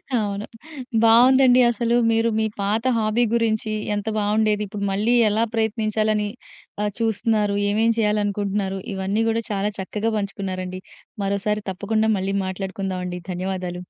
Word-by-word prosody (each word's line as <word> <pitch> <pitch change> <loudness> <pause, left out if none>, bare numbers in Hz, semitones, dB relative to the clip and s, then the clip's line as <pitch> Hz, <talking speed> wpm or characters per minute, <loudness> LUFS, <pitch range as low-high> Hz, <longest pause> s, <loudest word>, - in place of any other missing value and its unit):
అవును. 205 -2 -1 0.6
బావుందండి 250 +2 +6
అసలు. 235 +1 0 0.2
మీరు 225 +1 +2
మీ 220 - +1 0.2
పాత 210 +3 0
హాబీ 220 +2 +1
గురించి 220 -2 0 0.2
ఎంత 205 +1 -4
బావుండేది. 210 0 +1
ఇప్పుడు 200 0 -4
మళ్ళీ 210 +5 +1 0.2
ఎలా 220 +2 +1
ప్రయత్నించాలని 215 -1 0 0.6
ఆహ్, 210 - 0
చూస్తున్నారు. 215 -2 +1
ఏవేం 220 +3 +2
చేయాలనుకుంటున్నారు, 205 -2 0
ఇవన్నీ 195 +3 -1
గూడా 225 0 0
చాలా 200 +1 0
చక్కగా 210 +4 -2
పంచుకున్నారండి. 185 -2 -4 0.4
మరోసారి 200 +1 -1
తప్పకుండా 215 +3 0
మళ్ళీ 195 +1 -2
మాట్లాడుకుందాం 190 0 -4
అండి. 180 0 -5
ధన్యవాదాలు. 180 -1 -4
210 Hz, 125 wpm, -22 LUFS, 195-220 Hz, 0.6 s, బావుందండి